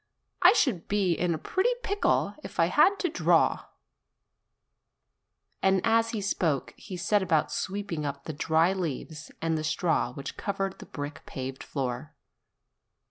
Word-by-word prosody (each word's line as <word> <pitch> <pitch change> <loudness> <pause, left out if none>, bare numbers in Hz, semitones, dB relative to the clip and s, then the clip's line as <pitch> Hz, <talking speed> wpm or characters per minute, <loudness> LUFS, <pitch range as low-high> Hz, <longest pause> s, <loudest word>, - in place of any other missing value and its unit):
I - - +8
should 250 - +1
be 200 -4 +2
in 170 0 0
a - - -3
pretty 375 - +1
pickle 405 +1 +1
if - - -9
I - - +4
had 400 +1 +5
to 360 - +1
draw 335 - +2 0.9
!" - - -52
And 190 0 +4
as 225 0 +3
he 220 -2 -3
spoke 165 -7 0
he 185 -3 -8
set 200 +4 +2
about 165 -5 +1
sweeping 195 -5 -3
up 140 -1 -4
the 160 - -5
dry 160 +4 +2
leaves 160 -3 -4
and 160 -1 +1
the - - -4
straw 160 -4 +1
which 135 +2 -7
covered 195 -1 -3
the - - -10
brick 145 0 -6
paved 130 0 -5
floor. 130 +1 -4
170 Hz, 155 wpm, -28 LUFS, 150-200 Hz, 0.9 s, I